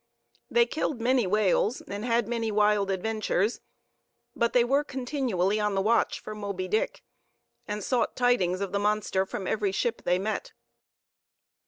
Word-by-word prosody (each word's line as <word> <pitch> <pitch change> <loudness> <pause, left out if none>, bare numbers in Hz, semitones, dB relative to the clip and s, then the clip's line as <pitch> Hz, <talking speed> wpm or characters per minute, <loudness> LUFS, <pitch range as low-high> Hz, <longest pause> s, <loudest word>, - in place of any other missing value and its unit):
They 475 0 +4
killed 300 - -2
many 245 -2 +2
whales, 210 +3 +2
and 200 +1 -6
had 235 -2 +1
many 230 -2 -1
wild 210 -1 +2
adventures; 215 +2 -1 0.7
but 235 0 +1
they 245 - +4
were 275 +4 +2
continually 245 -8 -1
on 210 -1 0
the 195 - +2
watch 230 +3 +2
for 215 - -7
Moby 200 -3 -4
Dick, 215 +4 -1 0.6
and 210 -1 -3
sought 245 0 0
tidings 200 -7 +2
of 195 -2 -2
the 200 - 0
monster 205 -2 0
from 190 - -5
every 205 -1 0
ship 230 +4 -1
they 180 - +1
met. 215 - -3
215 Hz, 155 wpm, -27 LUFS, 200-240 Hz, 0.7 s, They